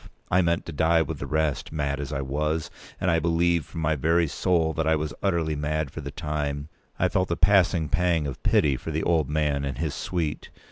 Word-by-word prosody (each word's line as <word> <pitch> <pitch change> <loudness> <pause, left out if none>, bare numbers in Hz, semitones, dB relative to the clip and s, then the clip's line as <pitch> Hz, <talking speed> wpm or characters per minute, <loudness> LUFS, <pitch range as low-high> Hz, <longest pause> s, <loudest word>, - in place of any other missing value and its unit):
I 90 - +5
meant 85 -1 0
to - - -6
die 80 +2 +3
with - - -6
the - - -5
rest. 80 -2 -1
Mad 70 -2 -2
as 70 0 -4
I 70 -2 -2
was—and 75 +5 -2
I 85 - +3
believe 85 -1 +1
from 80 - -6
my 80 0 +1
very 80 +4 +2
soul 80 +1 +1
that 80 0 -1
I 80 - +4
was 75 0 -3
utterly 85 -5 0
mad 75 -1 -2
for - - -7
the - - -6
time—I 75 -1 -3
felt 95 -1 0
a 85 - +1
passing 90 -3 +3
pang 85 -2 +1
of 65 -3 -5
pity 70 -3 +3
for - - -7
the 80 0 -1
old 80 -5 +2
man 75 -2 0
and 70 -3 -3
his 80 0 -2
suite. 85 -5 -3
80 Hz, 215 wpm, -26 LUFS, 75-85 Hz, -, I